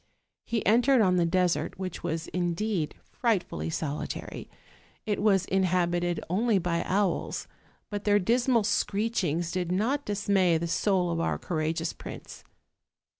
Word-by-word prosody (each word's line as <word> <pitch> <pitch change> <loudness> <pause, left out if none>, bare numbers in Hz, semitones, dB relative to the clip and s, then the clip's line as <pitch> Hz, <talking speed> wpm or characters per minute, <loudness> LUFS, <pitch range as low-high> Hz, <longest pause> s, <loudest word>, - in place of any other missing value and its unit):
He 230 -2 -2
entered 245 +5 +5
on 185 -3 +3
the 170 -1 +3
desert, 180 +1 +1
which 185 -2 -5
was 165 -1 -3
indeed 175 -1 -1 0.2
frightfully 220 -8 -1
solitary: 155 -2 -4 0.6
it 210 -3 -1
Avas 195 -3 +3
inhabited 175 -2 +1
only 210 +5 +2
by 170 -2 0
owls, 195 -2 0 0.4
but 205 0 -3
their 205 -1 +4
dismal 235 +3 +2
screechings 200 -5 0
did 180 -2 -2
not 240 +10 +1
dismay 200 -5 +2
the 165 - -2
soul 180 0 +1
of 165 - -1
our 165 - 0
courageous 160 -1 -2
prince. - - -10
185 Hz, 130 wpm, -28 LUFS, 170-210 Hz, 0.6 s, entered